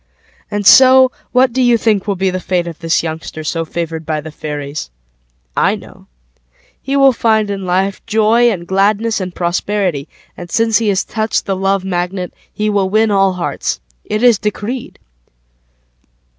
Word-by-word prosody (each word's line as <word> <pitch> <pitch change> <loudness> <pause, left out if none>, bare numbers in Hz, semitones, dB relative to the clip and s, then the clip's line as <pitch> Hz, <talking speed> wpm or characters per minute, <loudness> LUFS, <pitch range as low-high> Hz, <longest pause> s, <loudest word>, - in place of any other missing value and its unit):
And 205 -1 -3
so, 260 +3 +7 0.2
What 250 -1 +3
do 260 - 0
you 245 -2 +4
think 215 -3 0
will 200 - 0
be 190 0 0
the 185 - -3
fateOf 175 -3 -2
this 165 -1 0
youngster 160 -1 -6
So 165 +2 -2
favored 165 0 -4
by 155 -1 -2
the 155 +1 -8
fairies?I - - -5
know. - - -14 0.7
He 275 +1 -1
will 275 -1 +5
find 220 -3 +1
in 195 -1 -4
lifeJoy 215 +5 +2
and 175 -5 -5
gladness 205 +4 +1
and 180 -1 -5
prosperity, 175 -3 -1 0.3
And 175 -1 -9
since 225 +3 +2
he 225 - -1
has 195 -1 +1
touched 220 0 -2
The 195 - -1
Love 195 0 0
MagnetHe 185 +3 -3
will 200 -2 +1
win 215 +2 +2
all 195 -1 +3
hearts.It 175 - -4
is 240 -4 +5
decreed. 215 +4 -4
195 Hz, 150 wpm, -16 LUFS, 170-220 Hz, 0.7 s, so